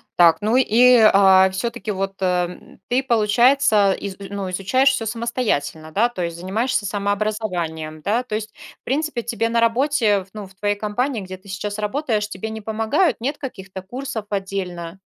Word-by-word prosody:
Так, 170 -2 +6
ну 215 +3 +1
и, 250 0 +5 0.2
а, 190 -1 +6
всё-таки 235 +3 -3
вот 195 0 -3
ты, 190 - -1
э, 180 -1 +2
м, 180 - -13
ты, 255 +2 +1
получается, 230 -2 +3
из 195 0 -4
и 195 -1 -9
ну, 200 -2 -4
изучаешь 195 +9 +2
всё 260 -4 -1
самостоятельно, 220 - -2
да? 215 +8 +3
То 190 -7 -5
есть 170 0 -4
занимаешься 215 +6 -1
самообразованием, 200 -6 -2
да? 225 +8 0
То 215 - -4
есть, 215 0 -5 0.3
в - - -82
принципе, 270 -3 -1
тебе 230 -1 -1
на 235 - +1
работе 230 -4 +2
в - - -23
ну, 210 -2 -7
в 190 - -20
твоей 205 +2 -1
компании, 220 +4 -2
где 185 0 -7
ты 195 +1 -17
сейчас 205 +2 -4
работаешь, 215 -1 -1
тебе 210 +2 -5
не 220 0 -6
помогают, 225 - 0
нет 275 +6 -2
каких-то 190 -8 -8
курсов 240 +2 -6
отдельно? 190 -3 -4
210 Hz, 185 wpm, -21 LUFS, 190-235 Hz, 0.3 s, Так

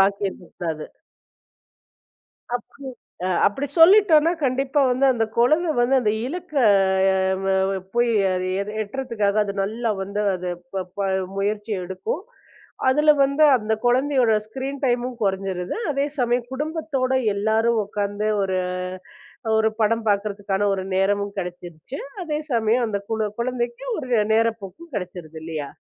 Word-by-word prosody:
பாக்கி 200 +1 +2
இருக்க 180 - -11
கூடாது. 160 -3 -4 1.7
அப்டி 245 - -5 0.5
அ - - +1 0.2
அப்படி 270 +8 0
சொல்லிட்டோம்னா 335 -3 +7
கண்டிப்பா 270 +2 +1
வந்து 255 +2 +2
அந்தக் 225 -2 -1
குழந்தை 310 +8 +3
வந்து 245 +3 +3
அந்த 210 -3 +2
இலக்க 345 +3 -6 1.2
அ - - -1 0.2
போய் 240 0 +2 0.7
எட்டறதுக்காக 215 -3 -2
அது 200 -1 -4
நல்லா 225 +4 -2
வந்து 200 +2 -4 0.2
அது 180 0 -4 0.2
ப 190 -1 -1
ப - - -6 0.4
முயற்சி 210 +2 -2
எடுக்கும். 190 - -4 0.7
அதுல 300 +3 +5
வந்து 280 +3 +2
அந்தக் 220 0 -2
குழந்தையோட 255 -1 +3 0.2
ஸ்கிரீன் 270 +4 -5
டைமும் 245 0 0
குறைஞ்சிருது. 190 -2 -2 0.2
அதே 275 +1 0
சமயம் 245 0 0
குடும்பத்தோட 295 -3 -2 0.2
எல்லாரும் 220 +2 +2
உக்காந்து 205 +1 -2
ஒரு 190 -1 0 1.0
ஒரு 220 0 +3
படம் 225 +1 +1
பாக்கறதுக்கான 200 -1 0
ஒரு 190 -1 -2
நேரமும் 200 +1 +1
கிடைச்சுடுச்சு. 175 - -6 0.2
அதே 300 -2 -2
சமயம் 230 +2 +2
அந்தக் 200 -1 -4 0.3
குழந்தைக்கு 240 - -3
ஒரு 260 -5 -6 0.2
நேரப்போக்கும் 230 - -1
கிடைச்சுடுது 175 -4 -6
இல்லையா? 155 -3 -5
225 Hz, 120 wpm, -23 LUFS, 200-260 Hz, 1.7 s, சொல்லிட்டோம்னா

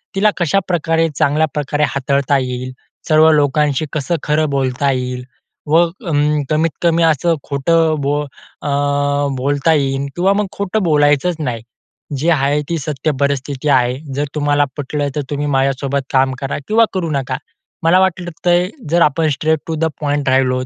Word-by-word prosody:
तिला 205 +2 +4
कशाप्रकारे 170 -2 +1
चांगल्या 155 +1 +2
प्रकारे 150 0 -1
हाताळता 140 0 +1
येईल, 130 0 -4 0.4
सर्व 155 +1 +6
लोकांशी 150 0 +2
कसं 155 +3 -1
खरं 150 0 +1
बोलता 135 0 0
येईल 125 -1 -3 0.4
व 160 +3 +5
अं, 150 -4 -1
कमीत-कमी 165 +2 +1
असं 165 +1 +2
खोटं 160 +3 +2
बोल 145 +1 0 0.4
अ, - - -5 0.7
बोलता 145 +4 +1
येईल 135 -1 0
किंवा 190 +3 +2
मग 205 0 0
खोटं 200 +1 -1
बोलायचंच 150 +1 +2
नाही. 125 -7 -3 0.6
जी 155 +6 0
आहे 145 -2 +2
ती 170 - 0
सत्य 150 +1 -2
परिस्थिती 140 0 -1
आहे. 125 -1 +2 0.2
जर 145 +1 0
तुम्हाला 145 -1 +2
पटलं 145 0 -2
तर 150 - 0
तुम्ही 145 0 -2
माझ्यासोबत 135 0 0
काम 130 0 +3
करा 135 - -3
किंवा 225 +1 +4
करू 180 -4 -2
नका. 135 -3 -2 0.5
मला 170 +3 +5
वाटतंय 175 -1 +1
तर 240 - -15
जर 170 +2 +2
आपण 160 +1 +3
स्ट्रेट 155 +2 0
टू 165 - -2
द 160 +1 0 0.2
पॉइंट 145 -2 0
राहिलोत, 130 -1 +2
150 Hz, 155 wpm, -17 LUFS, 140-165 Hz, 0.7 s, सर्व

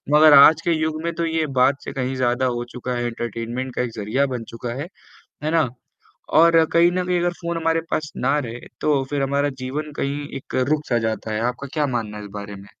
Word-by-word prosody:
मगर 155 0 +8
आज 155 +3 +7
के 170 - 0
युग 155 0 -1
में 170 - -1
तो 170 - -1
ये 160 -1 0 0.2
बात 135 +2 +3
से - - -4
कहीं 130 0 -2
ज़्यादा 125 0 +1
हो 120 - -2
चुका 125 0 -4
है 120 0 -2
एंटरटेनमेंट 120 +2 -4
का - - 0
एक 120 - -4
ज़रिया 110 +6 0
बन 115 - -5
चुका 120 0 -4
है, 165 - -5 0.6
है 155 - 0
ना? 160 -6 +2 0.7
और 165 +1 +6
कहीं 170 +1 +5
न 185 0 -1
कहीं 180 -1 +1
अगर 175 0 +1
फोन 170 0 -3
हमारे 165 0 +1
पास 150 -1 -1
ना 150 - +1
रहे, 120 -4 -5 0.2
तो 145 -3 +2
फिर 145 -1 0
हमारा 140 +1 +1
जीवन 150 +4 -4
कहीं 145 +1 -2
एक - - -12 0.2
रुक 155 0 0
सा 120 -2 +2
जाता 110 -1 -2
है, 105 - -1
आपका 125 +3 -2
क्या 150 -2 +1
मानना 115 -5 -3
है 105 - -8
इस 100 - -10
बारे 100 0 -6
में? 100 +1 -13
140 Hz, 235 wpm, -22 LUFS, 120-155 Hz, 0.7 s, मगर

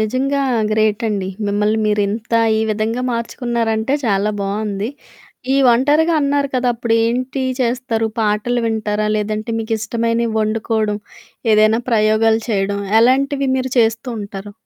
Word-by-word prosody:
నిజంగా 265 +6 0 0.3
గ్రేటండి. 215 -2 0 0.2
మిమ్మల్ని 210 +2 +1
మీరింత 210 +2 -1 0.2
ఈ - - +1
విధంగా 220 +3 -1
మార్చుకున్నారంటే 235 0 -1
చాలా 200 0 +1
బావుంది. 200 +1 -2 0.7
ఈ - - +3
ఒంటరిగా 295 +7 +3
అన్నారు 280 0 +1
కదా 250 0 +1
అప్పుడు 230 -1 -1
ఏంటి 255 +3 -2 0.2
చేస్తారు? 235 -2 0
పాటలు 215 +3 0
వింటారా? 215 -1 -1
లేదంటే 215 +2 -3
మీకిష్టమైనవి 230 +1 -1
వండుకోవడం 215 -1 -1 0.5
ఏదైనా 215 +2 +4
ప్రయోగాలు 220 0 +3
చేయడం 200 -1 0 0.2
ఎలాంటివి 275 +3 +2
మీరు 260 -1 -3
చేస్తూ 225 +2 +1
ఉంటారు? 200 0 -8
225 Hz, 115 wpm, -18 LUFS, 215-245 Hz, 0.7 s, ఏదైనా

